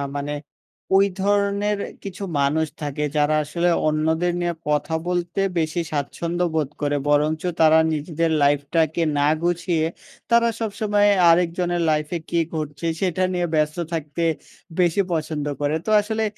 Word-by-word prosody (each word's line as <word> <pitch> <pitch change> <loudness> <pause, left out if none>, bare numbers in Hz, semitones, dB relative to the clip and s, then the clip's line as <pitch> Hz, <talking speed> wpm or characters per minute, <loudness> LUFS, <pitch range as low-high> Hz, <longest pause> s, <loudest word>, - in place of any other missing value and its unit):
মানে 145 +1 -3 0.6
ওই 195 +1 +6 0.2
ধরনের 205 +1 +1 0.3
কিছু 195 0 -7 0.2
মানুষ 150 +3 +1
থাকে, 145 0 -3
যারা 150 +1 +3
আসলে 170 +4 0 0.2
অন্যদের 160 +3 +1
নিয়ে 175 0 0 0.2
কথা 150 +2 0
বলতে 175 +1 -1 0.2
বেশি 160 +2 -1
স্বাচ্ছন্দ্যবোধ 160 +1 -1
করে। 145 0 0
বরঞ্চ 150 +2 +2 0.2
তারা 160 0 +6
নিজেদের 160 +2 -1
লাইফটাকে 155 +3 +1 0.2
না 145 - +3 0.2
গুছিয়ে, 170 -2 0 0.5
তারা 235 0 +5
সবসময় 205 -1 +1 0.2
আরেকজনের 175 +1 +2
লাইফে 155 +2 -1
কী 170 - +1 0.2
ঘটছে, 150 +1 -4 0.2
সেটা 185 -1 0
নিয়ে 175 -1 0
ব্যস্ত 150 +1 +1 0.2
থাকতে 160 +1 -3 0.6
বেশি 175 +2 +3
পছন্দ 155 -2 -2 0.2
করে। 145 +1 +1
তো - - -3
আসলে 220 +1 -2
165 Hz, 130 wpm, -22 LUFS, 150-180 Hz, 0.6 s, ওই